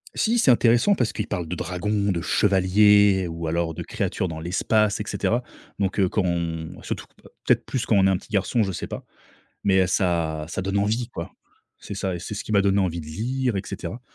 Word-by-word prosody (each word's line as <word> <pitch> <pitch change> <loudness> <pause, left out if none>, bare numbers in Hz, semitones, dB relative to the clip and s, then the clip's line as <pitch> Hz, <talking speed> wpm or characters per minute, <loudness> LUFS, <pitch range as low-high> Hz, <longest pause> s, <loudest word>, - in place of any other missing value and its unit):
Si, 230 +2 +2
c'est 145 - +5
intéressant 120 - +4
parce 120 - 0
qu'ils 105 - -4
parlent 90 -6 -3
de 90 - -4
dragons, 100 +4 -1
de 85 -2 -2
chevaliers 100 0 +4
ou 85 0 -5
alors 85 0 -1
de - - -7
créatures 95 - -2
dans 80 -2 -6
l'espace 105 +5 +1
et - - -2
cetera. 120 +2 0 0.4
Donc, 100 0 -1
heu, 95 - +4
quand 105 - 0
on 85 -2 -3
surtout - - -4 0.4
peut-être - - +2
plus 130 - -2
quand 110 - +3
on 95 -1 +5
est - - +4
un 95 - +2
petit 110 - -16
garçon, 100 +4 +1
je 100 -3 0
sais 90 - -5
pas. - - -7 0.6
Mais, 95 -1 +4
heu, - - -1
ça 85 -4 0
ça 90 - -4
donne 95 +2 -1
envie, 110 +4 0
quoi. 85 -8 -7 0.5
C'est - - -7
ça. 95 -2 -2
Et - - -6
c'est 90 - -6
ce 105 - -5
qui 110 - -3
m'a 100 - +5
donné 100 0 +2
envie 85 -3 -1
de 75 - -11
lire 120 +7 -2
et - - -1
cetera. 95 +8 -6
95 Hz, 230 wpm, -24 LUFS, 85-105 Hz, 0.6 s, c'est